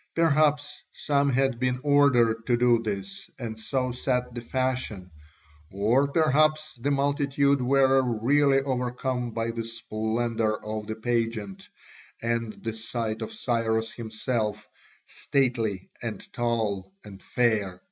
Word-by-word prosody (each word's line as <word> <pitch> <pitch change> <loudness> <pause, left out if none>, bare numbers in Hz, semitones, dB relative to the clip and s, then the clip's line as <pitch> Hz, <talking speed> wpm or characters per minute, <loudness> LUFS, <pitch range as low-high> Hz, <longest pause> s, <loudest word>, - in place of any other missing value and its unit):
Perhaps 150 -2 +2
some 140 -1 +1
had 135 -2 +1
been 125 0 0
ordered 125 -6 +3
to 120 -2 +3
do 120 -1 +4
this 100 -3 -5
and 110 -3 -6
so 130 +2 -1
set 125 0 -1
the 120 - -5
fashion, 125 -7 -2 0.6
or 115 +8 +2
perhaps 155 +1 +2
the 140 - 0
multitude 140 0 +2
were 135 +1 +4 0.2
really 135 +3 +4
overcome 125 -1 -2
by 115 0 -2
the 115 0 -4
splendour 115 0 -2
of 110 0 -4
the 110 - -3
pageant 115 -3 -2 0.5
and 115 -1 -1
the 115 -1 -2
sight 110 0 -3
of 110 0 -4
Cyrus 115 -2 -1
himself, 110 -2 -3 0.4
stately 115 -8 -1
and 110 -4 -6
tall 110 -5 -1
and 95 -2 -11
fair. 105 -7 0
120 Hz, 125 wpm, -26 LUFS, 110-135 Hz, 0.6 s, do